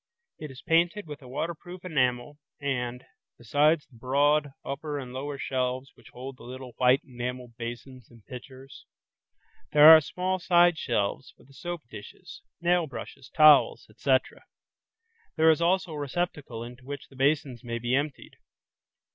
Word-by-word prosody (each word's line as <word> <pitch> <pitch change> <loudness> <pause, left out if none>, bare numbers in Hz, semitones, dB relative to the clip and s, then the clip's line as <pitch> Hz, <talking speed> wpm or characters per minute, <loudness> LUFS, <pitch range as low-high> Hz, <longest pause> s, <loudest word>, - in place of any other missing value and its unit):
This 155 - -7
is 130 -1 -12
painted 170 +5 +2
with 150 -1 -9
a 130 - -13
waterproof 170 +6 -6
enamel 130 -3 -1 0.2
and, 125 -3 -3 0.3
besides 145 +6 +2
the 120 - -21
broad, 145 +4 +2 0.2
upper 145 +2 -4
and 125 -3 -7
lower 140 +2 -5
shelves 130 0 -2
which 120 - -18
hold 130 +1 -9
the - - -15
little 130 +1 -9
white 130 +3 +4
enameled 125 -1 -6
basins 120 +2 -8
and 115 -3 -19
pitchers, 130 +1 -12 0.9
there 150 0 +8
are 160 - +6
small 185 +4 -2
side 175 0 +4
shelves 115 +1 -2
for - - -21
the 140 - -21
soap 175 +2 -6
dishes, 105 -3 -12 0.2
nail 175 -1 +2
brushes, 135 -1 -9
towels, 155 -2 +5
etc. 130 -2 0 0.9
There 160 0 +5
is 160 - 0
also 180 0 +1
a 150 - -5
receptacle 145 -5 -4
into 120 +2 -11
which 140 +2 -8
the 135 - -18
basins 135 -2 0
may 115 -1 -4
be 120 +1 -2
emptied. 145 +1 -2
135 Hz, 155 wpm, -27 LUFS, 125-155 Hz, 0.9 s, there